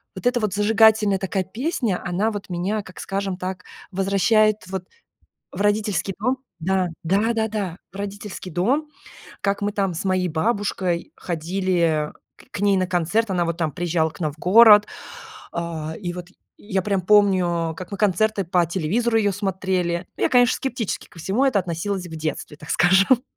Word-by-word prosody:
вот - - -9
это 245 0 +2
вот 210 -4 -1
зажигательная 210 -1 +4
такая 190 0 -1
песня. 235 - -2
Она 195 +6 0
вот 205 -2 -7
меня, 195 +4 -2
как 185 - -13
скажем 195 -1 -3
так, 185 0 -5 0.3
возвращает 200 +3 +3
вот 190 -1 -4 0.7
в 190 - -5
родительский 205 -3 0
дом. 250 +5 0 0.2
Да, 185 +2 +1 0.2
да 205 +7 +2
да 220 -1 0
да. 200 -5 -4
В - - -19
родительский 200 -2 -6
дом, 255 - 0 0.5
как 200 0 0
мы 205 - 0
там 195 -3 0
с 170 - -4
моей 185 -1 +1
бабушкой 185 0 -1
ходили 170 -2 -1 0.4
к - - -5
ней 200 -1 +3
на 185 - +1
концерт. 185 +5 0
Она 175 -2 +1
вот 170 0 -3
там 160 -3 -1
приезжала 165 0 0
к 150 - -16
нам 155 -3 -1
в 150 - -21
город, 210 +3 +7 0.7
а, 160 -2 -4
и 175 -3 -3
вот 180 0 -8 0.3
я 195 -2 -2
прям 195 0 0
помню, 180 -5 +3
как 185 0 -8
мы 200 - -4
концерты 210 0 +1
по 175 0 +2
телевизору 205 +8 0
ее 205 -2 +2
смотрели. 185 -3 -1
Я, - - +1
конечно, 245 -1 +5
скептически 245 -5 -3
ко 170 - -16
всему 200 - 0
это 260 -7 +3
относилось 180 +1 -3
в 160 - -8
детстве, 155 -1 -4
так 150 - -11
скажем. 195 +8 +4
190 Hz, 170 wpm, -22 LUFS, 175-210 Hz, 0.7 s, город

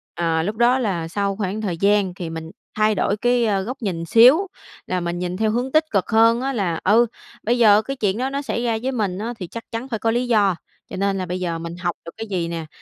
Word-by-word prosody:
Ờ, 165 -1 0
lúc 205 +6 -3
đó 240 +3 +4
là 185 -9 -2
sau 200 +2 -1
khoảng 205 +1 -3
thời 190 -6 -2
gian 200 0 +2
thì 175 -3 -6
mình 160 0 -7 0.2
thay 215 0 +2
đổi 200 - 0
cái, 245 +2 +2
ơ, 200 -3 +1
góc 250 +6 -6
nhìn 175 -6 -2
xíu 250 - +6 0.4
là 185 - -1
mình 175 0 -3
nhìn 180 0 -3
theo 215 +2 +1
hướng 245 +4 -2
tích 310 +1 +4
cực 195 -3 0
hơn 230 +1 +4
á 270 +1 -1
là, 185 -9 -1
ừ, 225 +5 +5 0.4
bây 240 +3 +1
giờ 215 -2 +6
cái 275 +4 -5
chuyện 205 -4 0
đó 260 +2 -1
nó 280 +1 -3
xảy 240 - -3
ra 230 -2 0
với 265 +1 -1
mình 205 -7 -2
á, 225 +4 -3
thì 180 - -5
chắc 230 +6 -8
chắn 230 +3 -5
phải 230 -4 -3
có 225 - 0
lý 240 +2 0
do, 205 -6 +3 0.3
cho - - -6
nên 195 0 0
là 185 - -3
bây 180 +1 -4
giờ 170 -2 -2
mình 170 +1 -6
học 175 -1 -3
được 170 - -7
cái 225 - -6
gì 175 -3 -1
nè, 165 -1 -5
205 Hz, 265 wpm, -21 LUFS, 180-235 Hz, 0.4 s, xíu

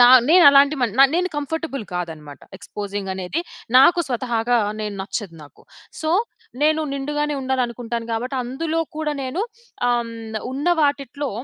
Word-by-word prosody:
నా 245 - +10 0.2
నేను 350 +1 +7
అలాంటి 280 +1 +6
మన్ 235 -5 +1
న - - +9
నేను 365 +1 +1
కంఫర్టబుల్ 295 -3 -3
కాదన్నమాట. 160 -5 -6 0.2
ఎక్స్పోజింగ్ 200 0 -6
అనేది 190 - -3 0.4
నాకు 345 +7 +6
స్వతహాగా, 240 -1 0 0.2
నేను 210 -1 -4
నచ్చదు 190 -2 -5
నాకు. 145 - -17 0.4
సో, 315 0 -1 0.5
నేను 310 +1 +3
నిండుగానే 295 +2 -2
ఉండాలనుకుంటాను 240 -3 -2
కాబట్టి, 250 +4 -2
అందులో 320 +6 -2 0.2
కూడా 305 -1 -2
నేను 265 +10 -2 0.5
ఆహ్, 235 -1 0 0.4
ఉన్న 280 +5 -4
వాటిట్లో 285 -1 -1
260 Hz, 135 wpm, -21 LUFS, 225-295 Hz, 0.5 s, నా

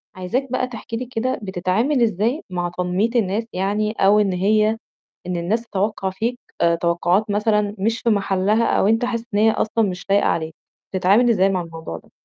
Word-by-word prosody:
عايزاك 235 +9 -3
بقى 255 0 0
تحكي 230 -1 -7
لي 250 - -4
كده، 255 +1 -2
بتتعامل 195 +9 0
إزاي 225 - 0
مع 175 -1 -2
تنمية 180 +5 0
الناس 210 0 +1
يعني 205 +3 0
أو 210 -1 +3
إن 200 -3 +1
هي 210 +4 +3 0.6
إن 180 -1 -2
الناس 190 +7 0
تتوقّع 205 -3 -2
فيك 230 +6 -3 0.2
آآ 170 0 +4
توقعات 175 +4 +1
مثلًا 210 0 +1
مش 225 +4 0
في 235 - +1
محلها 200 +1 +1
أو - - +2
أنت 225 +3 +2
حاسس 230 -2 -3
إن 205 - +2
هي 220 +1 +5
أصلًا 220 +1 0
مش 180 +1 -8
لايقة 200 +1 +3
عليك، 160 -1 -2 0.4
بتتعامل 195 +6 +3
إزاي 195 -4 +3
مع 185 -2 0
الموضوع 165 - -7
ده. - - -18
205 Hz, 185 wpm, -21 LUFS, 185-225 Hz, 0.6 s, هي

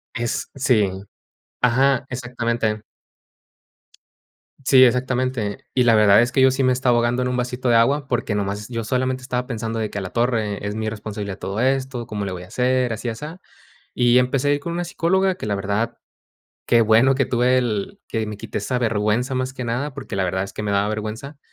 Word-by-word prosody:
Es 120 +1 -2
sí. 120 -7 +2 0.7
Ajá, 130 +2 +3
exactamente. 120 -3 -2 1.8
Sí, 130 -1 +7
exactamente. 125 -3 0
Y 125 - +4
la 115 -2 +5
verdad 105 0 +6
es 120 +1 +1
que 130 - +2
yo 130 - +7
sí 135 +1 0
me 130 0 +4
estaba 125 -1 +2
ahogando 120 +1 +1
en 125 - 0
un 125 0 -1
vasito 125 0 -2
de 115 - +4
agua, 135 +5 +3
porque 120 -3 -1
nomás 105 +1 -3
yo 115 -2 -3
solamente 130 +2 -1
estaba 125 0 -3
pensando 115 -2 -3
de 110 - -2
que, 100 - -4
a - - -4
la 90 - -5
torre, 110 -4 -1
es 105 - -3
mi 110 0 -2
responsabilidad 105 -2 -6
todo 100 +3 -4
esto, 130 -2 -1
¿cómo 105 -2 -4
le 95 - -4
voy 90 -1 -6
a - - -12
hacer? 125 +3 +1
Así, 115 +2 -4
asá. 150 +10 -6 0.6
Y 120 0 +4
empecé 140 +3 +1
con 170 - -5
una 175 0 -2
psicóloga 190 +3 +1
que, 145 - -6
la 100 - 0
verdad, 105 +4 -2 0.7
qué 115 - +4
bueno 115 +4 +5
que 135 -1 +1
tuve 125 +1 +2
el 110 -5 -2
que 110 -1 -1
me 105 - -6
quité - - -5
esa 125 +5 -2
vergüenza, 115 +2 0
más 130 +1 -2
que 130 -1 -6
nada, 125 +5 -2
porque - - -6
la 95 - +1
verdad 95 +1 -1
es 100 - -9
que 105 - -5
me 105 - -2
daba 100 +1 +1
vergüenza. 110 +7 -5
120 Hz, 205 wpm, -22 LUFS, 105-130 Hz, 1.8 s, Sí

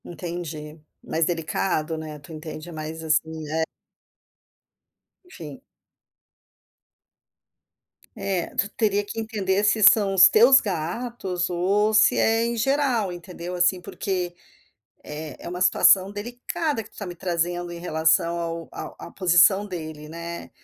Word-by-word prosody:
Entendi, 165 -2 -7 0.2
mais 160 0 0
delicado 165 -1 -1
né, 155 -1 -7
tu 145 +3 -13
entende 155 +1 -8
mais 160 0 -6
assim, 160 0 +1
né. 155 +2 -2 1.6
Enfim. 360 - -10 2.5
É, 195 -4 -3
tu 200 - +1
teria 205 -2 0
que 205 - -8
entender 205 -3 -1
se 210 +1 +2
são 200 -1 +6
os 190 0 +9
teus 245 +7 +7
gatos 185 0 -3
ou 200 +5 +1
se 215 0 +5
é 225 +1 +3
em 235 0 -2
geral, 255 -4 +1
entendeu 175 0 -7
assim, 180 +1 +2
porque 180 -1 -4 0.7
é 150 -1 -7
é - - -5
uma 180 +1 -5
situação 185 +1 +5
delicada 245 +7 -3
que 220 - -14
tu - - -30
está 205 - -7
me 175 -1 -7
trazendo 175 0 -2
em 170 - -7
relação 165 0 +1
ao 165 0 -5
ao - - -8
à - - -10
posição 190 +2 +4
dele, 155 -5 -7
né, 170 +2 -7
180 Hz, 135 wpm, -24 LUFS, 165-205 Hz, 2.5 s, os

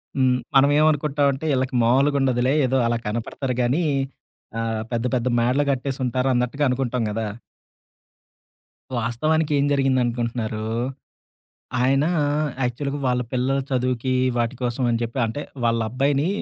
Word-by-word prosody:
హ్మ్. 130 -2 +3 0.2
మనం 135 +1 +6
ఏమనుకుంటామంటే, 145 -2 +2
ఈళ్ళకి 130 0 -1
మామూలుగుండదులే. 130 0 +2
ఏదో 130 +1 +1
అలా 120 - +1
కనపడతారుగానీ, 125 +6 -1 0.8
ఆహ్, 115 -1 -2
పెద్ద 120 0 -1
పెద్ద 125 0 0
మేడలు 125 +5 +2
గట్టేసుంటారు 130 -1 -1
అన్నట్టుగా 125 +4 0
అనుకుంటాం 125 -1 -1
గదా! 110 +1 -2 1.7
వాస్తవానికి 150 +7 0
ఏం 140 - +2
జరిగిందనుకుంటున్నన్నారు? 120 -5 0 1.2
ఆయన 135 +3 +3 0.6
యాక్చువల్‌గా 140 +4 -2
వాళ్ళ 125 0 +1
పిల్లల 130 +2 +1
చదువుకి 130 0 0 0.3
వాటి 120 +1 0
కోసం 120 +1 -1
అని 115 - +1
జెప్పి 115 +3 -4
అంటే 115 +6 -4 0.2
వాళ్ళబ్బాయిని 130 +6 +1
125 Hz, 110 wpm, -23 LUFS, 120-135 Hz, 1.7 s, మనం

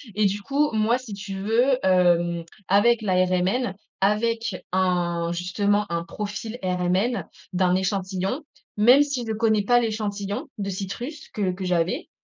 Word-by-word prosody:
et 210 0 +2
du 200 +1 0
coup, 285 +4 +1
moi, 220 +3 +2
si 255 -5 -9
tu 195 -1 -6
veux, 240 +6 +2
hem, 175 -2 +3 0.2
avec 220 +4 +4
la 195 -3 0
RMN, 190 +4 0 0.3
avec 220 +1 +1 0.2
un, 175 -2 0
justement, 200 +4 0
un 170 0 -1
profil 210 +4 -5
RMN 185 +6 0 0.3
d'un 180 0 +2
échantillon 190 +6 -1 0.3
même 250 +7 +7
si 275 -4 -3
je 225 - -3
connais 220 -1 +2
pas 245 +4 +4
l'échantillon 210 +3 -3
de 200 -1 -3
citrus 235 - -6
que 195 -5 -1
que 190 - -6
j'avais, 180 - 0
205 Hz, 145 wpm, -24 LUFS, 185-230 Hz, 0.3 s, même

